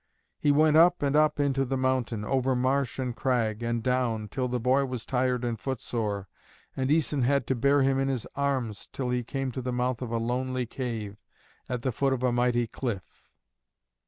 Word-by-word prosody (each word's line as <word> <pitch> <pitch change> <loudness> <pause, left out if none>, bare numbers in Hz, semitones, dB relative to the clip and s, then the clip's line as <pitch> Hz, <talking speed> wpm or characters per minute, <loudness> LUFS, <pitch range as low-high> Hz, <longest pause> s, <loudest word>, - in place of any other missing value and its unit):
He 145 - +2
went 155 +1 +5
up 175 0 +5
and 140 0 +1
up 155 -1 +3
into 135 -1 +2
the 135 0 -1
mountain, 130 -4 0
over 130 +2 +1
marsh, 130 +1 0
and 125 -3 -2
crag, 120 -5 0
and 115 -1 -1
down, 120 -4 0
till 130 +2 -2
the 125 0 -1
boy 130 +4 +3
was 125 -3 -5
tired 125 -1 0
and 115 -2 -2
footsore, 110 -6 -3 0.5
and 130 0 -1
Æson 150 -2 +2
had 135 +1 +2
to 130 - 0
bear 140 +3 +3
him 135 0 +2
in 135 - +1
his 130 -5 -1
arms 130 -7 -2
till 125 -2 -3
he 125 0 0
came 135 +2 -3
to 130 - -4
the 125 0 -3
mouth 125 0 -1
of 125 - -4
a 115 - 0
lonely 125 +2 -1
cave, 115 -4 -5 0.5
at 125 -2 -3
the 130 - +1
foot 135 +3 +1
of 130 -1 -3
a 125 - +3
mighty 120 0 +2
cliff. 110 -5 -6
125 Hz, 200 wpm, -28 LUFS, 120-135 Hz, 0.5 s, went